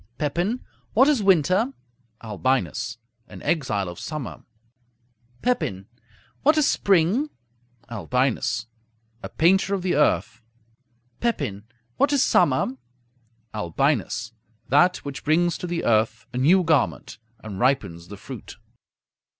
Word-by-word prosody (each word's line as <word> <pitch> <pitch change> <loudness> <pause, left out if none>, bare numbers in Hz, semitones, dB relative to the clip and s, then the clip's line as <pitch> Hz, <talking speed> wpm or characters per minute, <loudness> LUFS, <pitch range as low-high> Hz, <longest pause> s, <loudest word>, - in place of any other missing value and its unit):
Pepin 175 - -1 0.3
What 260 +5 +5
is 290 -7 +3
winter? 190 - +3 0.5
Albinus 115 +1 -1 0.3
An - - -11
exile 110 - 0
of 90 -1 -8
summer. 150 -4 -6 1.0
Pepin 100 - -1 0.6
What 305 +2 +4
is 305 - +4
spring? 200 - +2 0.6
Albinus 115 +2 -1 0.6
A - - -6
painter 190 +4 +3
of 190 - -4
the 185 - +1
earth. 145 -4 +1 0.8
Pepin 135 - -2 0.3
What 280 - +3
is 280 -2 +3
summer? 130 -5 +2 0.8
Albinus 105 +3 -1 0.4
That 175 +8 +4
which 140 -1 -6
brings 170 +3 +2
to 180 - -4
the 170 -1 -2
earth 110 -1 +1
a - - -4
new 180 +8 +5
garment, 155 -9 0 0.2
and 100 -3 -7
ripens 100 -10 0
the 100 +2 -9
fruit. - - -10
145 Hz, 115 wpm, -24 LUFS, 115-185 Hz, 1.0 s, What